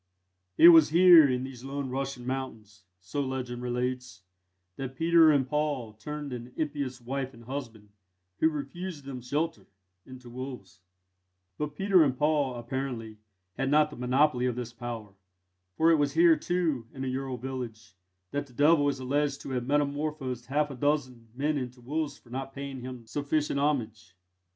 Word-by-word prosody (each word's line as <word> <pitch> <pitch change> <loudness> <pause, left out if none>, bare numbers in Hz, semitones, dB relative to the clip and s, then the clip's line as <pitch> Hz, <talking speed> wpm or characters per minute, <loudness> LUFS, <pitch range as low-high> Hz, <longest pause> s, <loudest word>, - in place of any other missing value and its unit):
It 170 - +10
was 165 -3 +8
here, 170 -2 +8
in 125 0 0
these 130 -2 -8
lone 135 -1 -4
Russian 135 -2 -4
mountains, 110 -6 -6 0.2
so 95 +11 -3
legend 130 -2 -4
relates, 125 -5 -3 0.5
that 135 -1 -6
Peter 165 +2 +5
and 135 -3 +2
Paul 145 -6 -1
turned 145 +5 -6
an 120 +1 -8
impious 145 -4 -3
wife 130 +1 -4
and 115 - -14
husband, 115 -5 -7 0.5
who 160 - +4
refused 150 +1 -6
them 130 -2 -6
shelter, 150 +7 -2 0.4
into 130 -1 -11
wolves: 125 -6 -8 0.8
but 150 -1 -3
Peter 195 0 +4
and 130 -4 0
Paul, 150 -3 +1
apparently, 120 -3 -5 0.4
had 135 0 0
not 150 +1 +4
the - - -9
monopoly 125 +1 +2
of 125 - -1
this 120 -1 -5
power; 115 -3 -7 0.6
for 165 +1 +5
it 165 - +5
was 145 -1 +1
here, 335 -1 +6
too, 165 - -1
in 130 - -5
a - - -2
Ural 130 0 -3
village, 115 -5 -7 0.4
that 145 0 -3
the 125 - -19
Devil 145 +2 +4
is 135 -2 -3
alleged 140 +2 -1
to - - -7
have 125 -1 -2
metamorphosed 145 -3 -1
half 145 +2 0
a - - -7
dozen 130 -4 -1
men 145 +2 0
into 125 -1 -6
wolves 150 +5 -3
for 120 - -21
not 135 +1 -5
paying 140 -1 -6
him 125 -2 -8
sufficient 145 +2 -1
homage. 115 -10 -2
135 Hz, 165 wpm, -28 LUFS, 125-150 Hz, 0.8 s, It